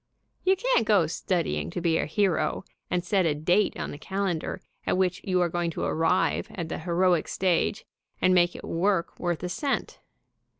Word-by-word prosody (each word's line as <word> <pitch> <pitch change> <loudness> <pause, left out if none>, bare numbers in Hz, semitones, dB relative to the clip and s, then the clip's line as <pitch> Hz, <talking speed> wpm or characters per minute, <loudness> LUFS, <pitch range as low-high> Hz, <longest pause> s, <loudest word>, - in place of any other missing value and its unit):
You 380 +1 +4
can't 470 - +1
go 200 -6 +5
studying 175 +2 -1
to 175 - -4
be 165 -2 +1
a - - -1
hero 170 0 0 0.2
and 180 -1 0
set 190 -2 +2
a 150 - +1
date 175 +7 +1
on - - -3
the 145 - -8
calen 190 -1 -1
dar - - -5 0.3
at - - +2
which 185 -1 +1
you 185 -2 +1
are 175 - +3
going 170 0 -1
to - - -1
arrive 165 +3 +1
at 170 -3 -5
the - - -4
heroic 175 0 +2
stage 185 +1 0 0.3
and 185 - +4
make 175 -1 +3
it - - -9
work 175 0 0
worth 175 -1 -2
a 180 - -2
cent. 275 +10 -2
180 Hz, 195 wpm, -27 LUFS, 170-190 Hz, 0.3 s, go